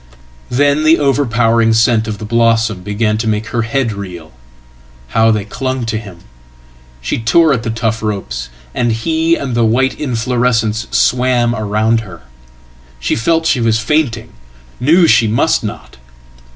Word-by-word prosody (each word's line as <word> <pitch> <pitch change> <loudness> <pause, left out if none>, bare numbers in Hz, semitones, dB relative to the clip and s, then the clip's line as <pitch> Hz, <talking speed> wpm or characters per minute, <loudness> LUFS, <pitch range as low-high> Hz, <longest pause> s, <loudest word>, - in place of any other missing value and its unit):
Then 145 +4 +2
the 160 +1 +5
overpowering 115 -5 +2
scent 115 0 +2
of 105 -1 -4
the 110 - -7
blossom 115 -2 +1
began 105 +2 -1
to 115 - -2
make 110 +1 -1
her 120 - -1
head 115 0 -1
reel. 90 -6 -8 0.8
How 115 0 +3
they 105 -3 0
clung 130 +3 -3
to 110 -1 -2
him! 95 -6 -12 0.8
She 60 - -2
tore 155 +7 +3
at 120 - -1
the 115 - -4
tough 115 0 -2
ropes, 80 - -4 0.2
and 120 -1 0
he 160 +8 0
and 135 -5 -4
the 120 - +1
whiteinflorescence 120 -2 0
swam 125 -1 +2
about 110 +1 0
her. 90 -9 -11 0.8
She 65 - -1
felt 165 +9 0
she 140 - +2
was 115 -1 +2
fainting, 115 -2 -1 0.5
knew 165 +8 +4
she 115 -8 +4
mustnot. 110 +2 -1
115 Hz, 145 wpm, -15 LUFS, 110-125 Hz, 0.8 s, the